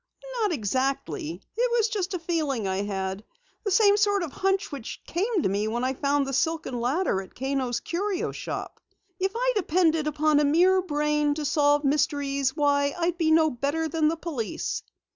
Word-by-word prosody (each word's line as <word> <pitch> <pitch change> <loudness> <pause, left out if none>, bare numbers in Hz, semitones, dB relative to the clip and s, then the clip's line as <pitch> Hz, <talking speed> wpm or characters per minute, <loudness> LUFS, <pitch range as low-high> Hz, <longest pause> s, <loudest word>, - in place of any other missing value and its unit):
"Not 420 -3 +2
exactly. 215 - -2
It 485 +2 +1
was 450 -2 +3
just 395 -4 -2
a - - 0
feeling 310 - -1
I 190 0 -1
had 195 0 -3 0.4
the 415 - -1
same 405 +1 +5
sort 405 -2 +2
of 320 - -5
hunch 385 +3 0
which 275 -6 -6
came 390 +2 0
to - - +3
me 200 +2 0
when 235 +3 -2
I 260 +1 +1
found 280 +1 +1
the 270 - -4
silken 310 -2 -1
ladder 250 - 0
at 190 - -14
Kano's 260 -2 -1
Curio 380 +2 -2
Shop. - - -6 0.4
If 385 +1 0
I - - +1
depended 325 -5 +2
upon 305 0 +2
a - - +3
mere 360 +6 +4
brain 300 -3 0
to 305 -1 -3
solve 290 0 +3
mysteries, 280 -1 +1
why 285 -1 +2
I'd 345 0 -1
be 320 -2 +2
no 315 -1 +4
better 285 +6 -1
than 315 0 +1
the 325 +2 0
police." 295 -10 -3
300 Hz, 180 wpm, -26 LUFS, 270-355 Hz, 0.4 s, same